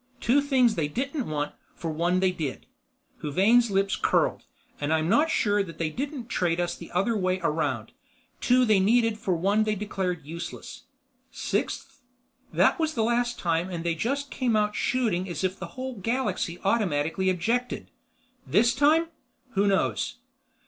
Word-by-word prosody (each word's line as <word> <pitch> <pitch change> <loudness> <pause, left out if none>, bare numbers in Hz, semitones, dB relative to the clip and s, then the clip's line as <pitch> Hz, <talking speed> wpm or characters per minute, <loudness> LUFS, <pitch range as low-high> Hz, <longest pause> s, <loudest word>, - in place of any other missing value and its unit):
Two 270 +5 +3
things 260 -5 +3
they 160 -7 -1
didn't 270 - -3
want 150 -1 -2 0.2
for 165 - -4
one 175 +4 +1
they 190 -1 +3
did," 150 - -5 0.6
Huvane's 215 +11 +3
lips 195 0 +1
curled, - - +1 0.4
"and 145 +1 -1
I'm 160 0 +2
not 295 - +3
sure 205 -9 +2
that 165 -5 -6
they 160 -2 -1
didn't 275 - -4
trade 175 -7 0
us 175 0 -1
the 170 - -11
other 195 +6 +1
way 185 -2 0
around; 160 0 -1 0.5
two 250 0 +4
they 215 -4 +4
needed 225 +2 +3
for 185 -4 0
one 200 +6 +2
they 215 0 0
declared 185 -6 -3
useless. 170 +3 -7 0.4
Sixth? - - -3 0.5
that - - +3
was 315 -1 0
the 225 - +1
last 240 +1 +1
time 170 +1 0
and 170 -3 -4
they 170 -1 +1
just 275 - -2
came 245 -4 0
out 210 -1 +1
shooting 210 -8 0
as 175 - -4
if 185 0 -1
the - - -5
whole 260 0 -4
galaxy 205 -5 -1
automatically 190 -4 +1
objected. 230 +8 -1 0.6
This 235 +1 +4
time? 320 +3 +3 0.4
Who 200 -2 +2
knows?" 195 -1 +1
200 Hz, 160 wpm, -26 LUFS, 175-240 Hz, 0.6 s, two